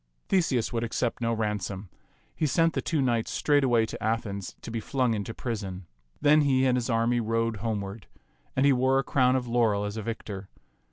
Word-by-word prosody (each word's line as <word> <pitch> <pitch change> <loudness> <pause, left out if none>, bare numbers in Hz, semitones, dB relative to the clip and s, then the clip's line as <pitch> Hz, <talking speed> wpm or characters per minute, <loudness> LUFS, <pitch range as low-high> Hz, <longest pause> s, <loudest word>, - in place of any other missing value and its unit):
Theseus 135 - +1
would 115 0 0
ac 115 - -4
cept 120 -1 -1
no 115 0 +1
ransom. 105 -3 -2 0.5
He 155 - +1
sent 165 +4 +2
the - - -1
two 155 -4 0
knights 120 -3 +1
straightway 130 -6 +3
to - - -8
Athens 105 -3 -2
to - - -6
be 115 - -2
flung 125 +1 0
into 105 +1 -3
prison. 100 -6 -5 0.3
Then 150 +1 +5
he 135 -2 +3
and 130 -1 +3
his 125 0 -1
army 115 +1 +2
rode 115 0 0
homeward, 100 -3 -4 0.5
and 135 - +3
he 140 - +6
wore 130 +1 +3
a 135 - +2
crow^n 130 -2 +3
of 130 -1 0
laurel 115 -4 +2
as 105 +2 -4
a - - -2
victor. 105 -3 -6
115 Hz, 200 wpm, -27 LUFS, 110-130 Hz, 0.5 s, he